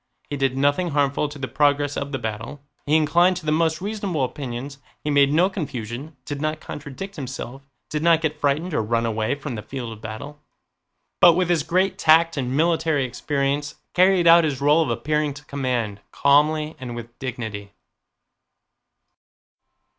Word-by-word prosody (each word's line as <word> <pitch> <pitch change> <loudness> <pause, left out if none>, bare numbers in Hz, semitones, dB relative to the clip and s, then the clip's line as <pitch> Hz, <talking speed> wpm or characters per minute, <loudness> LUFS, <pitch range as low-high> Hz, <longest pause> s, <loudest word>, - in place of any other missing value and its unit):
He - - -1
did 135 -1 0
nothing 145 +6 +2
harmful 145 0 +1
to 145 - -9
the 135 -2 -4
progress 145 0 +1
of 140 0 -4
the 135 - -1
battle; 115 +5 -6 0.2
he 150 - +3
inclined 175 +4 +4
to 175 - -8
the 155 - +1
most 160 +1 +1
reasonable 200 -7 -2
opinions, 135 +1 -5 0.2
he 150 - -1
made 140 -1 +4
no 170 +5 +4
confusion, 145 - -6
did 145 -1 -5
not 155 0 -1
contradict 155 +9 -8
himself, 135 -1 -6 0.3
did 150 - -3
not 165 -1 +4
get 155 -2 -3
frightened 150 +5 0
or - - +1
run 115 +2 0
away 110 +3 -1
from 145 -2 -6
the 110 - -5
field 120 +1 -6
of 110 - -13
battle, 130 +7 -8 0.8
but 175 - +8
with 180 +1 0
his 170 -3 +2
great 185 +5 0
tact 165 +1 +5
and 130 -1 -2
military 160 -3 +2
experience 140 +3 -2 0.2
carried 185 -1 +4
out 170 0 +8
his 145 -5 -1
role 145 +3 +4
of 155 - 0
appearing 145 +5 -1
to 145 0 -12
command, 125 -7 -2
calmly 150 +2 +2
and 125 -2 -6
with 120 0 -9
dignity. 110 -6 -5
145 Hz, 170 wpm, -23 LUFS, 130-160 Hz, 0.8 s, but